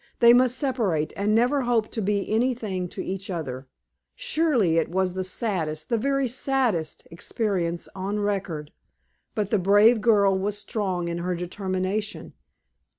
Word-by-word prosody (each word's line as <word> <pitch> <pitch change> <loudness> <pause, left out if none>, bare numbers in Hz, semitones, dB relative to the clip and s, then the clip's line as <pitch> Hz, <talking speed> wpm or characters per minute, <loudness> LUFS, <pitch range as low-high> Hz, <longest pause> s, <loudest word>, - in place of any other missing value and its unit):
They 235 -1 +8
must 250 0 +4
separate, 220 - 0
and 210 +2 +1
never 250 +5 +3
hope 240 -3 +1
to 225 - -3
be 200 0 0
anything 220 -6 0
to 185 - -6
each 195 +1 -5
other. 135 -7 -5 0.5
Surely 305 - +1
it 165 - -1
was 185 +1 0
the 185 0 -2
saddest 175 -6 -3
the 235 - +2
very 275 +2 +1
saddest 245 - -1
experience 175 -1 -2
on 195 +2 -3
record. 190 -7 -2 0.6
But 210 -3 -1
the 215 - +3
brave 205 +5 +5
girl 200 -4 +4
was 200 +2 -1
strong 190 -5 -2
in 170 0 -3
her 180 +1 -1
determination. 185 +3 -3
200 Hz, 150 wpm, -25 LUFS, 180-235 Hz, 0.6 s, They